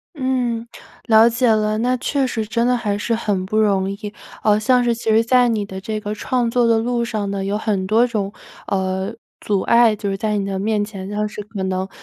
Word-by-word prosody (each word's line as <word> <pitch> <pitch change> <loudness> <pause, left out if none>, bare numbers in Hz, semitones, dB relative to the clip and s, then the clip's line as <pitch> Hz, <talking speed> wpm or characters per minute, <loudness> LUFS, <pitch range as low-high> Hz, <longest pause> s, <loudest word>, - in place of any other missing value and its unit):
嗯， 245 -4 -1 0.4
了 220 0 +6
解 235 +1 +1
了。 215 0 +1
那 250 +2 +1
确 275 +2 0
实 225 -3 -2
真 230 +2 0
的 250 0 +3
还 205 -3 -2
是 230 +2 -1
很 200 -4 -1
不 215 - -3
容 195 -3 +2
易。 205 +1 -6 0.3
呃， 210 0 +3
像 250 +2 +3
是 235 - +2
其 230 - -10
实 225 +1 +4
在 250 0 +4
你 215 -3 0
的 190 -1 -7
这 215 +2 -4
个 210 0 -4
创 240 +2 -1
作 240 0 +2
的 230 -1 +3
路 240 +1 -1
上 210 -4 -3
呢， 195 -1 -3
有 200 +2 -1
很 205 -3 -1
多 225 +4 +3
种， 205 -5 -2 0.4
呃， 190 +2 -2 0.3
阻 200 -2 0
碍， 235 -2 +4
就 200 -1 -3
是 195 - -2
在 210 0 -1
你 200 - -1
的 195 -1 -3
面 210 +1 0
前， 195 -2 -8
但 210 +1 -1
是 210 0 -7
可 205 -2 -6
能 185 0 -2
215 Hz, 245 characters per minute, -20 LUFS, 200-235 Hz, 0.4 s, 了